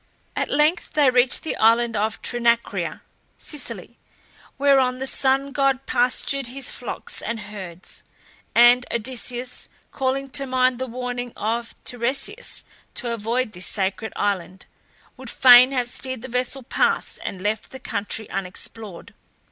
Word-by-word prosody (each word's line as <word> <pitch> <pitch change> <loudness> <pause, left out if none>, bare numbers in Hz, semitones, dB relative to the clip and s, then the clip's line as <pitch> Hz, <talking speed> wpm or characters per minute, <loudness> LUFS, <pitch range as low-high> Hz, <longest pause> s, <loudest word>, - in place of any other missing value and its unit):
At - - -1
length 305 +4 +1
they 290 -4 +4
reached 250 +1 +3
the 320 - -3
island 230 +1 +4
of 215 +1 -1
Trinacria 235 -1 0 0.3
(Sicily), 235 - -7 0.6
whereon 270 -2 +3
the 265 - -4
sun 270 +1 +1
god 275 -2 +1
pastured 255 +2 +1
his 260 +1 -4
flocks 245 - -3
and 230 0 -3
herds, 195 -4 -8 0.5
and 240 +1 +7
Odysseus, 250 +1 -3 0.2
calling 270 0 -2
to 275 0 -1
mind 255 -1 +2
the 260 - -3
warning 245 0 -5
of 230 +2 -2
Tiresias 245 +2 0 0.3
to 240 -2 -2
avoid 230 +2 -1
this 180 -1 -5
sacred 195 +2 -1
island, 190 -2 -2 0.5
would 260 -2 -9
fain 250 +1 +8
have 250 -3 0
steered 260 -1 -2
the - - -5
vessel 250 +2 -2
past - - 0
and 185 -1 -5
left 210 +1 -1
the 265 - -9
country 215 -2 -4
unexplored. 195 +1 -5
245 Hz, 135 wpm, -23 LUFS, 220-260 Hz, 0.6 s, fain